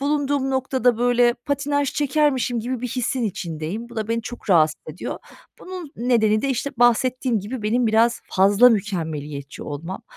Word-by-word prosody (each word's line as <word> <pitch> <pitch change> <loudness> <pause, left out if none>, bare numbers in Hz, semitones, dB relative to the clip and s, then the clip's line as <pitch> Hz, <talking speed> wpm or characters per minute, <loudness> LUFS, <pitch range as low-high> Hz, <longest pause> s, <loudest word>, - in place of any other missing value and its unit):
bulunduğum 285 -1 0
noktada, 260 -2 +1
böyle, 245 0 +3
patinaj 285 +2 -1
çekermişim 275 -4 +1
gibi 245 +1 -3
bir 250 - -3
hissin 250 +1 -2
içindeyim. 180 +3 -4
Bu 235 - -13
da 215 -1 -3
beni 230 0 -1
çok 240 -2 -7
rahatsız 155 -3 +4
ediyor. 155 - -6 0.4
Bunun 365 -5 -8
nedeni 220 -3 +2
de, 275 - 0
işte, 270 +2 -1
bahsettiğim 245 0 +2
gibi 220 +4 -6
benim 235 +3 +1
biraz 225 +1 +3
fazla 200 +6 +5
mükemmeliyetçi 155 -9 -3
olmam. 165 +6 -6
240 Hz, 155 wpm, -22 LUFS, 205-260 Hz, 0.4 s, fazla